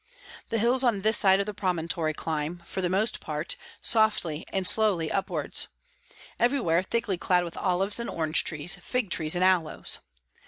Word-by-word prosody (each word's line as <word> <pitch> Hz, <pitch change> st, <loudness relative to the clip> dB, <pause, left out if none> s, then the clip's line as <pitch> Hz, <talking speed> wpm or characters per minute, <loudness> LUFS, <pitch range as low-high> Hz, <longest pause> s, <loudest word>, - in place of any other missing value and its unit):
The 230 Hz, -, 0 dB
hills 245 Hz, +4 st, +2 dB
on 230 Hz, -6 st, +2 dB
this 220 Hz, +1 st, +5 dB
side 190 Hz, -1 st, +5 dB
of 200 Hz, -, 0 dB
the 210 Hz, -, -5 dB
promontory 170 Hz, -4 st, -1 dB
climb, 160 Hz, +2 st, -3 dB
for 190 Hz, -, -4 dB
the 180 Hz, -, 0 dB
most 200 Hz, +5 st, +1 dB
part, -, -, -3 dB, 0.3 s
softly 210 Hz, -9 st, +1 dB
and 190 Hz, -1 st, -1 dB
slowly 195 Hz, -8 st, +2 dB
upwards, 195 Hz, -, 0 dB, 0.7 s
everywhere 235 Hz, -10 st, +2 dB
thickly 200 Hz, -2 st, -2 dB
clad 180 Hz, -1 st, +2 dB
with 170 Hz, -1 st, -7 dB
olives 195 Hz, +3 st, +1 dB
and 235 Hz, -, -4 dB
orange 160 Hz, -1 st, +1 dB
trees, 160 Hz, +3 st, 0 dB
fig 250 Hz, -7 st, -2 dB
trees 160 Hz, 0 st, +1 dB
and 180 Hz, -, +1 dB
aloes. 185 Hz, -4 st, +1 dB
185 Hz, 165 wpm, -27 LUFS, 165-220 Hz, 0.7 s, this